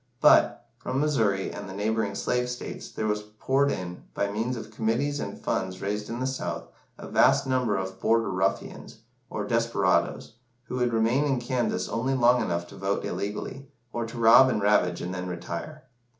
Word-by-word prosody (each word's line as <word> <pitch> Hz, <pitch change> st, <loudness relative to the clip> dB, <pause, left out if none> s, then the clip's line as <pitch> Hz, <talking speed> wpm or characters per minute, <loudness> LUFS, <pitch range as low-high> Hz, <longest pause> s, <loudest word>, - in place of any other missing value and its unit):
But, -, -, +5 dB
from 130 Hz, +1 st, -2 dB
Missouri 110 Hz, -10 st, +1 dB
and 100 Hz, -1 st, -7 dB
the 95 Hz, -, -7 dB
neighbouring 105 Hz, 0 st, -1 dB
slave 125 Hz, +4 st, 0 dB
states, 125 Hz, -, -6 dB
there 110 Hz, -, -4 dB
was 105 Hz, 0 st, 0 dB
poured 130 Hz, +7 st, 0 dB
in, 90 Hz, -1 st, -5 dB
by 100 Hz, 0 st, 0 dB
means 115 Hz, +4 st, -2 dB
of 110 Hz, -1 st, -8 dB
committees 120 Hz, +7 st, 0 dB
and -, -, -5 dB
funds 95 Hz, 0 st, -2 dB
raised 105 Hz, +1 st, -3 dB
in 120 Hz, -, -4 dB
the 130 Hz, -, -1 dB
South, 130 Hz, 0 st, -3 dB, 0.3 s
a -, -, -9 dB
vast -, -, +4 dB
number 125 Hz, -6 st, +1 dB
of 95 Hz, 0 st, -5 dB
"Border 115 Hz, +3 st, +2 dB
ruffians," 95 Hz, +1 st, -2 dB, 0.3 s
or -, -, -3 dB
desperadoes, 115 Hz, -, +1 dB, 0.3 s
who 125 Hz, -, -5 dB
would 125 Hz, -1 st, +1 dB
remain 115 Hz, +5 st, +2 dB
in 135 Hz, -3 st, +1 dB
Kansas 120 Hz, -6 st, -1 dB
only 130 Hz, +5 st, -1 dB
long 125 Hz, -1 st, +4 dB
enough 85 Hz, -5 st, -1 dB
to -, -, -12 dB
vote 100 Hz, +1 st, -1 dB
illegally, 105 Hz, +7 st, -4 dB, 0.3 s
or 115 Hz, -1 st, -2 dB
to 115 Hz, -, -9 dB
rob 115 Hz, +3 st, +7 dB
and 120 Hz, -, 0 dB
ravage, 100 Hz, -3 st, +2 dB
and 90 Hz, +1 st, -4 dB
then 90 Hz, 0 st, -4 dB
retire. 90 Hz, -, -6 dB
110 Hz, 180 wpm, -27 LUFS, 100-125 Hz, 0.3 s, rob